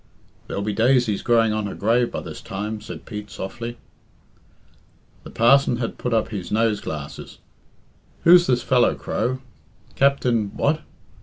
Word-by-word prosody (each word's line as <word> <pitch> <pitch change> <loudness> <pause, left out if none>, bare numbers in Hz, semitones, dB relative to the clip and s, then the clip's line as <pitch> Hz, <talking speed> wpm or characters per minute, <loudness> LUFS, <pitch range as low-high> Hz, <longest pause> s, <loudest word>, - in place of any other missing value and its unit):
"There'll 100 - -3
be 105 0 -2
daisies 115 -1 +2
growing 115 -2 +3
on 105 -1 -2
her 100 - -6
grave 115 +3 +2
by - - -4
this - - -8
time," 105 +2 -5
said 110 - -9
Pete 105 -2 -7
softly. 115 +5 -6 1.5
The - - -10
parson 125 +2 +4
had 115 -1 -4
put 125 - -2
up 110 -1 +1
his 100 -5 -6
nose 110 -1 +1
glasses. 75 -2 -7 0.9
"Who's 175 +1 +7
this 125 -2 +1
fellow, 125 -2 +3
Crow? 130 +1 -2 0.5
Captain 125 -6 +2
what? 155 +2 +1
115 Hz, 145 wpm, -22 LUFS, 105-125 Hz, 1.5 s, Who's